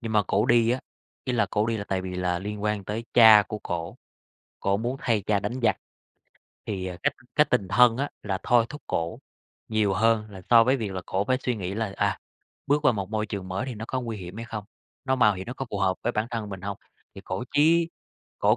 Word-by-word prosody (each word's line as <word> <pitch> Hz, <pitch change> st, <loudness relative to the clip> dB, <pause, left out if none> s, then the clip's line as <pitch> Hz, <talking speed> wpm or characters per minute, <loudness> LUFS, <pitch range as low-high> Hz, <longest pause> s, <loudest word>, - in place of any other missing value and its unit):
Nhưng 115 Hz, -1 st, -4 dB
mà 105 Hz, -, +4 dB
cổ 105 Hz, +4 st, +2 dB
đi 120 Hz, -2 st, +4 dB
á, 125 Hz, +2 st, 0 dB, 0.4 s
ý 125 Hz, -, -1 dB
là 120 Hz, -, +2 dB
cổ 105 Hz, 0 st, +1 dB
đi 115 Hz, 0 st, 0 dB
là 100 Hz, -, -4 dB
tại 95 Hz, -1 st, -1 dB
vì 90 Hz, 0 st, -5 dB
là 90 Hz, -1 st, 0 dB
liên 105 Hz, +2 st, -5 dB
quan 105 Hz, -2 st, -1 dB
tới 110 Hz, +4 st, -4 dB
cha 110 Hz, -3 st, +9 dB
của 105 Hz, -, -4 dB
cổ, 85 Hz, +6 st, -4 dB, 0.6 s
cổ 100 Hz, 0 st, +1 dB
muốn 120 Hz, +5 st, -2 dB
thay 110 Hz, -4 st, +1 dB
cha 100 Hz, 0 st, +1 dB
đánh 120 Hz, +6 st, -3 dB
giặc. 110 Hz, -3 st, +3 dB, 0.9 s
Thì, 95 Hz, -3 st, -3 dB
à, 90 Hz, -, -5 dB
cái -, -, +2 dB, 0.2 s
cái 150 Hz, -, +7 dB
tình 100 Hz, -7 st, +1 dB
thân 115 Hz, +4 st, +5 dB
á, 140 Hz, +2 st, -1 dB
là 95 Hz, -3 st, -2 dB
thôi 120 Hz, -2 st, +4 dB
thúc 150 Hz, -2 st, -9 dB
cổ 85 Hz, 0 st, -2 dB, 0.5 s
nhiều 110 Hz, -3 st, +1 dB
hơn 110 Hz, 0 st, +2 dB
là 95 Hz, -2 st, -10 dB
so 115 Hz, -1 st, +8 dB
với 130 Hz, +3 st, +3 dB
việc 110 Hz, -6 st, -4 dB
là 95 Hz, -, -3 dB
cổ 95 Hz, +2 st, 0 dB
phải 130 Hz, 0 st, +1 dB
suy 125 Hz, -, +1 dB
nghĩ 95 Hz, 0 st, -4 dB
là, 110 Hz, -3 st, -2 dB
à, 100 Hz, -1 st, +1 dB, 0.5 s
bước 145 Hz, +1 st, +2 dB
qua 130 Hz, -, +6 dB
một 100 Hz, -1 st, -4 dB
môi 110 Hz, -1 st, -1 dB
trường 100 Hz, -2 st, -5 dB
mới 95 Hz, +8 st, -3 dB
thì 130 Hz, -, -4 dB
nó 110 Hz, -, -6 dB
có 130 Hz, -, -1 dB
nguy 115 Hz, -3 st, -4 dB
hiểm 90 Hz, +2 st, -8 dB
hay 115 Hz, -, -5 dB
không, 110 Hz, -3 st, -6 dB, 0.4 s
nó 130 Hz, 0 st, +1 dB
mạo 105 Hz, -5 st, +4 dB
hiểm 95 Hz, 0 st, -7 dB
nó 125 Hz, -, -4 dB
có 135 Hz, -, -5 dB
phù 100 Hz, -, -3 dB
hợp 95 Hz, -1 st, +1 dB
với 120 Hz, -, 0 dB
bản 105 Hz, +1 st, -1 dB
thân 110 Hz, -3 st, -3 dB
mình 95 Hz, -2 st, -6 dB
hông? 100 Hz, +1 st, -4 dB, 0.4 s
Thì -, -, -9 dB
cổ 95 Hz, +6 st, -3 dB
chí 165 Hz, +3 st, +4 dB, 0.5 s
cổ -, -, +4 dB
105 Hz, 250 wpm, -26 LUFS, 100-120 Hz, 0.9 s, cha